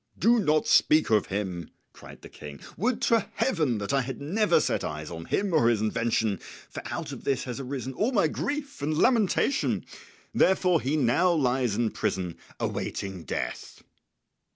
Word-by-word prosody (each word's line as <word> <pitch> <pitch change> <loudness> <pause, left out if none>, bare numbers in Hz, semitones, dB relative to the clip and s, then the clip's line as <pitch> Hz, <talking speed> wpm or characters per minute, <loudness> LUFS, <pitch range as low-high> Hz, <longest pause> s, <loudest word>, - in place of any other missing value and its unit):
"Do 235 +2 +4
not 155 -6 +2
speak 155 -5 +4
of 105 -2 +3
him," 95 -4 -4 0.2
cried - - -14
the - - -9
King. 70 -1 -10 0.2
"Would 235 +6 -1
to 230 -3 +2
Heaven 155 - +1
that 100 +5 -3
I 135 - +3
had 130 0 -5
never 200 +10 +2
set - - 0
eyes 75 0 -5
on 80 0 -7
him 195 - -1
or 120 -7 +4
his 115 -3 +2
invention, 110 -2 0 0.3
for - - -6
out - - -5
of - - -8
this 135 -2 0
has 125 0 -5
arisen 135 0 -5
all 215 - 0
my 200 -10 +3
grief 285 - -4
and 150 +1 -1
lamentation. 235 - +2 0.5
Therefore 180 -3 +3
he 140 +5 0
now 150 +7 +3
lies 130 -7 +1
in 115 -1 0
prison 90 -3 -2 0.2
awaiting 95 -4 -4
death." - - -5
135 Hz, 170 wpm, -27 LUFS, -, 0.5 s, Do